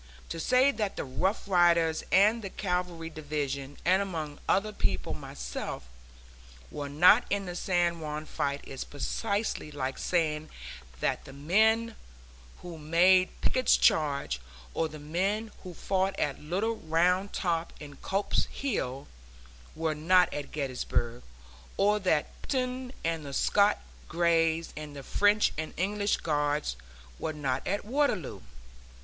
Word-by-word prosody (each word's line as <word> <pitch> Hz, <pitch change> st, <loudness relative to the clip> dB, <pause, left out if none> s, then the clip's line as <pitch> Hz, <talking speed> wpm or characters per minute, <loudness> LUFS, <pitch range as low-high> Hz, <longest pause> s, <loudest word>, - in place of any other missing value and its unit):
To 165 Hz, -, -4 dB
say 255 Hz, +9 st, +4 dB
that 210 Hz, -7 st, -2 dB
the -, -, -3 dB
Rough 185 Hz, -, -1 dB
Riders 170 Hz, -3 st, +3 dB
and 210 Hz, +5 st, +5 dB
the 195 Hz, -, -5 dB
cavalry 180 Hz, -4 st, -3 dB
division, 145 Hz, -3 st, -4 dB
and 185 Hz, +2 st, +4 dB
among 160 Hz, -7 st, -4 dB
other 210 Hz, +3 st, +2 dB
people 100 Hz, -, -1 dB
myself, 60 Hz, 0 st, -6 dB, 0.9 s
were 145 Hz, -1 st, -5 dB
not 180 Hz, +11 st, +6 dB
in 200 Hz, -1 st, 0 dB
the 175 Hz, -1 st, -5 dB
San 175 Hz, -2 st, +1 dB
Juan 155 Hz, -1 st, -4 dB
fight 140 Hz, -1 st, -2 dB
is 135 Hz, -, -5 dB
precisely 200 Hz, -, -2 dB
like 135 Hz, -2 st, -3 dB
saying 155 Hz, -3 st, 0 dB, 0.5 s
that -, -, 0 dB
the 135 Hz, -, -11 dB
men 220 Hz, +10 st, +2 dB, 0.7 s
who 170 Hz, -2 st, -8 dB
made 180 Hz, +4 st, +4 dB
Pickett's 255 Hz, 0 st, +3 dB
Charge, 140 Hz, -, +2 dB, 0.3 s
or 160 Hz, -, 0 dB
the 155 Hz, -, -9 dB
men 195 Hz, +9 st, -1 dB
who 180 Hz, -3 st, -9 dB
fought 195 Hz, +2 st, 0 dB
at 145 Hz, -2 st, -1 dB
Little 195 Hz, +9 st, -1 dB
Round 180 Hz, +4 st, +1 dB
Top 170 Hz, -2 st, -1 dB
and 145 Hz, -2 st, -11 dB
Culps 195 Hz, +1 st, 0 dB
Hill, 140 Hz, -, -3 dB, 0.7 s
were 160 Hz, -1 st, 0 dB
not 180 Hz, +4 st, +4 dB
at 145 Hz, -1 st, -5 dB
Gettysburg; 125 Hz, -4 st, -2 dB, 0.6 s
or 210 Hz, +2 st, +3 dB
that 180 Hz, -6 st, 0 dB
Picton 255 Hz, -1 st, -2 dB
and 165 Hz, -1 st, -1 dB
the 140 Hz, -1 st, -7 dB
Scotch 205 Hz, +7 st, +3 dB, 0.3 s
Greys 165 Hz, -1 st, +1 dB
and 150 Hz, -1 st, -7 dB
the 140 Hz, -, -7 dB
French 205 Hz, +7 st, +3 dB
and 160 Hz, -, -5 dB
English 205 Hz, +3 st, +1 dB
guards 145 Hz, -, 0 dB, 0.4 s
were 155 Hz, -, -2 dB
not 135 Hz, -3 st, -2 dB
at 200 Hz, +1 st, -1 dB
Waterloo. 245 Hz, -, 0 dB
170 Hz, 135 wpm, -29 LUFS, 150-200 Hz, 0.9 s, not